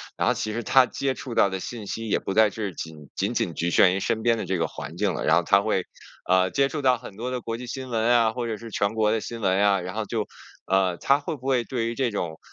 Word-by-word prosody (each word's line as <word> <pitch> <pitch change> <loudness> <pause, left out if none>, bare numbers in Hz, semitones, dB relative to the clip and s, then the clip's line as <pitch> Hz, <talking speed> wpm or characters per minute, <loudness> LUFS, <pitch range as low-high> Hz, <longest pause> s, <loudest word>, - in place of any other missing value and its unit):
然 - - 0
后 - - +4
其 110 - -3
实 115 +2 -3
他 130 +3 +5
接 135 +1 -2
触 130 -3 -7
到 100 - +4
的 95 0 -4
信 110 +3 -6
息， 115 +3 -5
也 105 - +2
不 95 - -4
再 110 +1 +5
是 105 -2 -4
仅 80 -3 -9
仅 - - -1
仅 85 - -1
局 85 +2 -1
限 90 +1 +5
于 - - -1
身 110 +3 -1
边 115 -1 +3
的 - - -3
这 95 - -1
个 85 - 0
环 - - -8
境 - - 0
了， - - -3
然 80 - +5
后 85 - +3
他 100 +4 +4
会， 100 -3 0 0.5
呃， 95 0 +4
接 140 +8 +2
触 150 - -4
到 130 -2 +4
很 115 -5 -11
多 120 +3 -3
的 125 -1 -3
国 115 0 -4
际 125 +1 -8
新 130 +1 -6
闻 115 -2 0
啊， 115 -2 +4
或 120 +1 -4
者 110 -2 -3
是 115 0 -10
全 100 +1 0
国 110 -1 +2
的 110 - +1
新 115 +1 -7
闻 95 -2 +2
呀， 100 -1 +3
然 90 +2 -6
后 110 -1 -2
就， 105 +1 -2 0.4
呃， 95 -1 +2
他 140 +8 +3
会 155 +2 -4
不 130 -2 -14
会 130 -3 +1
对 120 -3 -2
于 115 - -3
这 130 -1 +1
种， 85 -7 -4
110 Hz, 315 characters per minute, -25 LUFS, 95-120 Hz, 0.5 s, 他